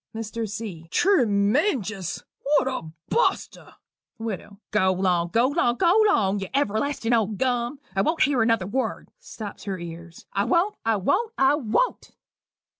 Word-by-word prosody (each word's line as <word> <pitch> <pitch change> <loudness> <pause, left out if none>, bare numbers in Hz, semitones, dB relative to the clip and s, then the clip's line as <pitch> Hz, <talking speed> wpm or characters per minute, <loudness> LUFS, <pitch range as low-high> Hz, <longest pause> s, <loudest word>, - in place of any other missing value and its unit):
MR. 225 0 -4
C. 200 -7 -6
"Treemenjous! 215 - +1 0.2
What 290 -1 +2
a 255 -12 -3 0.2
buster!" 475 - -1 0.4
WIDOW. 210 -3 -6
"Go 190 -3 +3
'long 180 -2 +1
go 230 +8 +2
'long 280 -6 +1
go 360 - +4
'long, 205 - +2
you 195 - -4
everlastin' 245 -1 0
old 215 -3 +1
gum. 245 +2 -1 0.2
I 195 - +3
won't 320 +11 +2
hear 270 -3 +2
another 225 -4 +2
word" 255 +7 -3
[stops 220 - -9
her 195 -2 -3
ears]. 170 0 -10
"I 200 +1 +1
won't, 345 - +2
I 225 -1 +2
won't, 405 - 0
I 270 +1 +4
won't." 295 - -1
225 Hz, 145 wpm, -24 LUFS, 195-280 Hz, 0.4 s, go